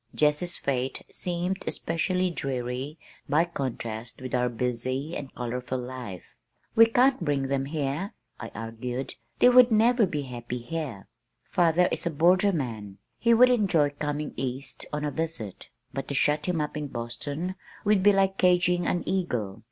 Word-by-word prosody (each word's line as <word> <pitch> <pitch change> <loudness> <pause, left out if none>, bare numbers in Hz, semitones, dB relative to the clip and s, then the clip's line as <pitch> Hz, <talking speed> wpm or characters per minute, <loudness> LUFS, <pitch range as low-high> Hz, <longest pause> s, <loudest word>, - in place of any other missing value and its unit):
Jessie's 150 +4 +2
fate 130 -1 -2
seemed 180 +2 -2
especially 180 +2 0
dreary 130 0 -3 0.3
by 155 +4 +4
contrast 120 -7 -5
with 130 0 -7
our 125 -1 +2
busy 125 +5 -2
and 135 -2 -6
colorful 125 +1 -3
life. 125 -7 -7 0.4
"We 230 0 +8
can't 250 -1 +3
bring 140 -3 0
them 135 -1 0
here," 150 +7 -2 0.2
I - - -6
argued. 115 +3 -4 0.2
"They 245 - +7
would 250 0 +8
never 225 0 +4
be 150 -4 -2
happy 120 -1 -5
here. 130 -5 -5 0.4
Father 175 -1 +4
is - - -2
a - - +2
borderman. 150 - +1 0.2
He 235 -1 +5
would 250 +2 +7
enjoy 180 -11 +3
coming 150 +1 -3
east 130 +2 -4
on 150 0 -2
a 145 - -1
visit, 160 - -4 0.2
but 135 +1 -4
to 140 - -3
shut 150 +3 +2
him 180 -3 0
up 150 0 -2
in 150 -1 -3
Boston 140 +9 -4 0.3
would 205 -2 +4
be 205 +2 +7
like 195 -1 +2
caging 180 -1 +3
an 175 - 0
eagle. 125 - -1
150 Hz, 155 wpm, -27 LUFS, 125-180 Hz, 0.4 s, We